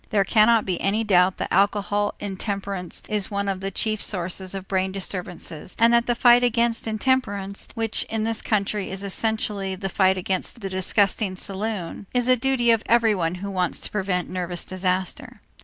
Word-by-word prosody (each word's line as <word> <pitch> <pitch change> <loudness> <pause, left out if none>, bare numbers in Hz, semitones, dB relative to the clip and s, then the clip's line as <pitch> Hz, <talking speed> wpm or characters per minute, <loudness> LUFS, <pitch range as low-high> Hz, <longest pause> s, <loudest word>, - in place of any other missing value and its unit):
There 205 -3 +3
cannot 220 +2 +4
be 185 -2 -2
any 210 +3 +1
doubt 185 -3 +3
that - - -3
alcoholic 205 +1 +1
intemperance 195 -2 -4
is 210 -2 -1
one 200 -1 -2
of 195 -1 -1
the 195 +1 -3
chief 215 +2 -1
sources 185 0 -2
of 190 0 -6
brain 190 0 0
disturbances 180 -4 -5
and 230 +1 +5
that 235 0 +3
the 240 - +2
fight 240 +1 +6
against 235 -1 +1
intemperance, 215 -4 -1
which 225 -1 0
in 220 -1 -2
this 225 0 -1
country 205 -1 -1
is 190 +1 -5
essentially 200 -1 -2
the 195 +1 -4
fight 190 -1 +3
against 190 +5 -3
the 195 -1 -4
disgusting 195 +1 +1
saloon, 195 -1 -4
is 245 0 +1
a 255 - +6
duty 250 -1 +2
of 225 -2 +3
everyone 210 -8 +2
who 200 - -4
wants 180 -2 -1
to - - -6
prevent 185 -3 -1
nervous 180 -1 -4
disaster. 185 0 -2
200 Hz, 175 wpm, -24 LUFS, 185-225 Hz, -, fight